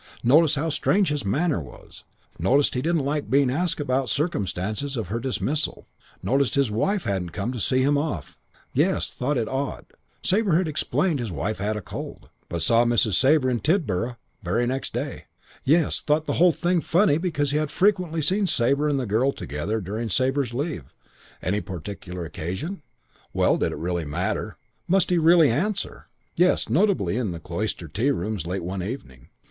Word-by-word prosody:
Noticed 155 +5 +5
how 155 +3 -1
strange 190 +4 +2
his 150 -3 -1
manner 145 - +1
was; 65 -4 -13 0.3
noticed 135 - +3
he 125 - -1
didn't 160 -1 +1
like 145 -3 -2
being 135 0 +3
asked 175 +5 0
about 135 -3 0
circumstances 110 - -2
of 105 -6 -3
her 115 +3 -1
dismissal; 135 +4 -1 0.4
noticed 135 0 +1
his 140 -5 +2
wife 195 - 0
hadn't 95 -6 -2
come 105 +5 -2
to 125 - -5
see 130 +4 +2
him 145 +1 +3
off. 145 - -4 0.3
Yes, - - +1
thought 135 +3 -1
it 115 -2 0
odd. 135 0 -3 0.4
Sabre 195 -3 +2
had 180 -1 +1
explained 155 0 0
wife 95 +6 -3
had 105 +2 -1
a 105 - -6
cold, - - -8 0.2
but 85 -3 -3
saw 115 +6 +4
Mrs. 120 -3 +2
Sabre 135 - +4
in 120 - 0
Tidborough 120 - 0 0.2
very 110 +6 0
next 130 +2 -2
day. - - -4 0.4
Yes, 155 +3 +2
thought 155 +1 +1
the - - -1
whole 180 0 +7
thing 175 +1 0
funny 170 -2 +3
because 150 -5 -1
had 150 0 0
frequently 180 -5 +1
seen 190 +6 +2
Sabre 140 0 +2
and 140 -2 +1
the 130 - -2
girl 115 +6 +2
together 90 - -3
during 110 +4 -4
Sabre's 130 +4 +1
leave. 140 - -3 0.6
Any 100 +4 0
particular 90 -1 -6
occasion? 95 - -5 0.5
Well, - - +3
did - - 0
it - - -5
really 85 -1 -2
matter? 75 0 -2 0.3
Must 190 0 +2
he 175 - +4
really 165 -3 +6
answer? 195 - -2 0.3
Yes, 180 -7 +2
notably 125 - +2
in 120 -5 -1
the 85 -2 -5
Cloister 85 0 -4
tea 110 - 0
rooms 105 - -2
late 95 +1 -3
one 95 +2 -3
evening. 90 - -7
130 Hz, 175 wpm, -24 LUFS, 105-155 Hz, 0.6 s, whole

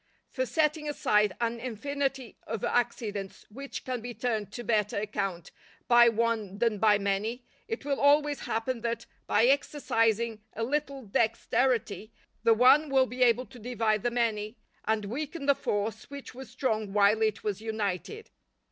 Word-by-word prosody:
For 260 -2 -2
setting 300 0 0
aside 210 -8 +2
an 235 0 -1
infinity 270 +1 -3
of 220 -2 -4
accidents 220 -5 -2
which 275 +5 -7
can 255 -2 -3
be 240 0 -7
turned 220 -3 -2
to 240 - -6
better 210 -4 0
account 200 -4 -3 0.4
by 240 -1 +7
one 225 -3 -1
than 225 -2 +1
by 210 0 +5
many, 205 +5 -2 0.2
it 450 -10 -5
will 280 -1 -1
always 290 0 +4
happen 230 +2 -2
that, 235 0 -3 0.2
by 230 - +4
exercising 230 -5 +1
a 225 - -3
little 280 +1 -2
dexterity, 225 +1 0 0.3
the 225 0 +4
one 275 +6 +5
will 265 -1 +4
be 255 +1 -7
able 245 0 +4
to 250 -1 -14
divide 225 -2 0
the 240 - +1
many, 225 -2 -1 0.3
and 220 -1 0
weaken 280 +7 -5
the 280 - +5
force 215 -5 -3
which 280 -2 -9
was 260 -1 -10
strong 220 -5 -2
while 205 +1 +4
it 215 -1 0
was 210 -1 -2
united. 220 - -4
230 Hz, 155 wpm, -29 LUFS, 215-260 Hz, 0.4 s, by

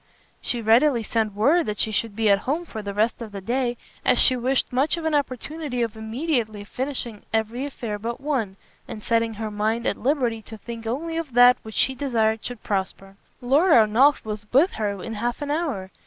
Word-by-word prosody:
She 240 -2 -2
readily 235 +2 +4
sent 220 -2 -1
word 285 +9 +3
that 210 -1 -3
she 220 - +1
should 215 0 -1
be 225 0 +1
at 200 - +4
home 310 +10 -2
for 220 -9 -7
the 205 -1 -5
rest 220 +3 +1
of 225 -2 -7
the 200 - -6
day, 245 +4 -1 0.3
as - - +3
she 255 - +6
wished 255 +1 0
much 270 +7 +2
for 335 -2 -6
an 320 - 0
opportunity 285 -1 -2
of 225 -1 -3
immediately 220 -2 -2
finishing 245 -2 -4
every 225 +5 -1
affair 225 -6 -5
but 235 +3 -4
one, 260 -9 -2 0.3
and 215 - -8
setting 230 -1 +1
her 215 0 -4
mind 220 +3 -1
at - - 0
liberty 245 -5 0
to 220 +1 -10
think 230 +1 -8
only 325 +8 -3
of 315 -6 -4
that 245 +1 +7
which 220 -1 -10
she 265 - +2
desired 225 -5 0
should 245 -3 -6
prosper. 195 0 -3 0.3
Lord 290 +8 +4
Ernolf 235 +5 +4
was 210 -1 -6
with 295 +9 +4
her 200 -3 -3
in 230 - -5
half 240 +3 -2
an 290 -1 -3
hour. 280 - -2
235 Hz, 205 wpm, -24 LUFS, 215-270 Hz, 0.3 s, that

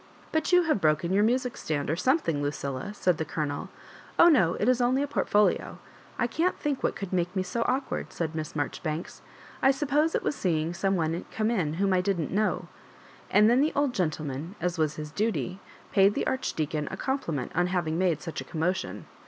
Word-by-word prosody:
" - - -25
But 315 +2 0
you 360 0 +6
have 310 - +1
broken 155 +3 +2
your 205 +2 +4
music 250 +2 +1
stand 145 -2 -2
or 155 - +1
something, 185 - +1
Lucilla," 140 +3 -3
said 180 -5 +1
the - - +1
Colonel. 150 -2 -3 0.5
Oh, 340 - +8
no; 215 - +4
it 210 - -1
is 255 -1 +3
only 255 +3 +2
a - - -2
portfolio 210 -7 +1 0.4
I - - +1
canl 325 +10 0
think 290 -3 -2
what - - 0
could 195 -2 -6
make 180 +1 0
me 190 - +1
so 210 +6 -3
awkward," 265 +2 -2
said 165 -2 -3
Miss 155 -1 -5
Marjoribanks; 155 +2 -3
^* - - -26 0.4
I 265 - +5
suppose 295 +3 +2
it - - 0
was - - 0
seeing 165 - 0
some 195 +2 0
one 165 0 -1
come 220 +1 0
in 165 -9 0
whom 195 +2 +1
I 185 - +3
didn't 180 -5 -1
know." 190 -3 0 0.6
And 210 +1 +5
then 245 +3 +4
the 305 - +1
old 285 -3 +1
gentleman, 155 - -3
as 175 0 -2
was 155 -1 +1
his 150 -1 -6
duty, 185 - -1 0.3
paid 200 +1 +4
the - - -1
Ardi 260 0 -1
deacon 150 -1 -2
a - - -6
compliment 170 - -2
on 175 +1 +2
having 175 -3 -1
made 170 -5 +1
such 165 - -5
a - - -6
commotion. 175 +3 -2
185 Hz, 210 wpm, -28 LUFS, 155-245 Hz, 0.6 s, Oh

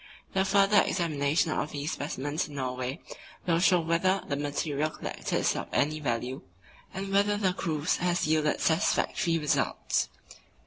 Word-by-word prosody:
The 190 0 +2
further 200 +1 +5
examination 155 -2 +1
of 155 - -2
these 145 +1 -3
specimens 145 +3 -3
in 145 - -11
Norway 130 +2 -3 0.4
will 170 -2 +2
show 180 -1 +4
whether 170 +4 +1
the 140 - -1
material 145 +1 -1
collected - - -6
is - - +2
of - - -4
any 155 +2 +1
value, 125 -1 -2 0.5
and 195 0 -5
whether 205 +1 +3
the 190 -3 +1
cruise 160 -2 -1
has 175 0 0
yielded 155 -1 +1
satisfactory 165 +1 +1
results. 150 -3 0
160 Hz, 145 wpm, -28 LUFS, 145-185 Hz, 0.5 s, further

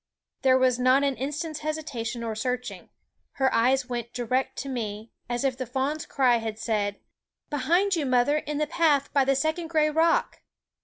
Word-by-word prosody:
There 260 -1 +5
was 255 -1 +2
not 255 +2 +4
an 275 -1 +1
instant's 300 +4 -4
hesitation 285 -7 -4
or 225 -1 -2
searching. 250 +3 -4 0.4
Her 265 -1 +1
eyes 255 +3 +2
went 240 -1 -5
direct 250 +2 -1
to - - -8
me, 225 -4 -5 0.2
as 240 +1 -1
if 270 -2 +1
the 255 -1 -5
fawn's 270 +5 -2
cry 255 -3 +3
had 220 -2 -4
said: 210 -3 -1 0.3
" - - -56
Behind 345 +8 +2
you, 305 -5 -1
mother, 255 +4 +3
in 300 0 -4
the 305 - +1
path 295 -3 +1
by 275 -2 +4
the 275 0 +2
second 315 +4 -1
gray 310 -2 +2
rock 325 +2 +1
265 Hz, 185 wpm, -26 LUFS, 240-300 Hz, 0.4 s, There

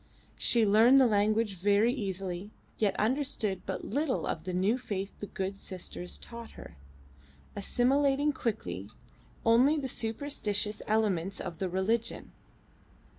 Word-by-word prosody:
She 230 -2 +4
learned 225 +6 +6
the 265 - +6
language 215 0 +2
very 205 +5 +3
easily, 195 -4 -4 0.3
yet 210 -3 +1
understood 225 -5 0
but - - -3
little 290 -1 -1
of 160 +1 -3
the 185 - -2
new 195 +7 +2
faith 200 -5 -4
the 205 - -5
good 190 0 -3
sisters 180 -2 -6
taught 235 -1 -10
her, - - -11 0.8
assimilating 275 +7 +2
quickly 210 - -3 0.6
only 250 +7 +5
the 275 -3 -2
superstitious 220 -4 -2
elements 200 -4 +1
of 175 -3 -6
the 190 - -1
religion. 220 +6 -1
215 Hz, 125 wpm, -30 LUFS, 195-245 Hz, 0.8 s, learned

